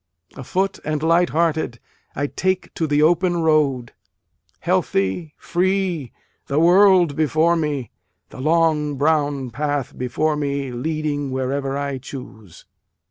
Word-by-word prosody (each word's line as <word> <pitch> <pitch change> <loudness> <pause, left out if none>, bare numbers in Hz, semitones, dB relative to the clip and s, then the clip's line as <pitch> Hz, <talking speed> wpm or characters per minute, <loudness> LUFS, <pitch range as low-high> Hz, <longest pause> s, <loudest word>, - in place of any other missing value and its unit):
Afoot 190 +9 -2
and 155 0 -2
light 170 +2 +3
hearted, 160 -7 0 0.4
I 145 - -1
take 185 +5 -2
to 160 - -1
the 145 0 +2
open 175 +2 +3
road, 140 -6 +1 0.7
Healthy, 95 - -1
free, 180 -6 -1 0.4
the 140 +2 +1
world 180 -2 +5
before 160 +2 +2
me, 145 -7 -2 0.4
The 130 - -9
long 155 -1 +2
brown 145 -3 0
path 145 +1 -2
before 140 +5 -1
me, 140 -2 -2
leading 145 +2 -2
wherever 135 +1 -2
I 140 -2 -3
choose. 110 - -11
150 Hz, 120 wpm, -21 LUFS, 135-165 Hz, 0.7 s, world